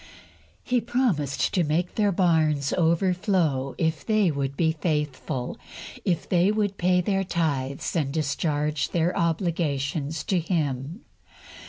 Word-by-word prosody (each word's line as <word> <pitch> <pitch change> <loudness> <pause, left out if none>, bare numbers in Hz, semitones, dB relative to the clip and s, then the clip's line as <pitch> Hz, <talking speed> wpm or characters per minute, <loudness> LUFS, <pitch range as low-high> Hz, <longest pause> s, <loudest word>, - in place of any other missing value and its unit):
He 250 -1 +1
promised 225 - 0
to 180 - +2
make 165 +4 0
their 205 -2 +2
barns 160 -6 +2
overflow, 170 -5 +1
if 160 -2 0
they 215 -5 +2
would 140 -1 -3
be 160 -2 +3
faithful, 150 -5 -2 0.4
if 175 -3 -1
they 180 +2 +3
would 205 -2 -1
pay 180 0 +3
their 195 +1 0
tithes 145 -7 -2
and 145 -5 0
discharge 150 0 -1
their 170 +1 0
obligations 160 -3 -1
to 185 - +1
Him. 155 - -2
165 Hz, 125 wpm, -25 LUFS, 145-180 Hz, 0.4 s, be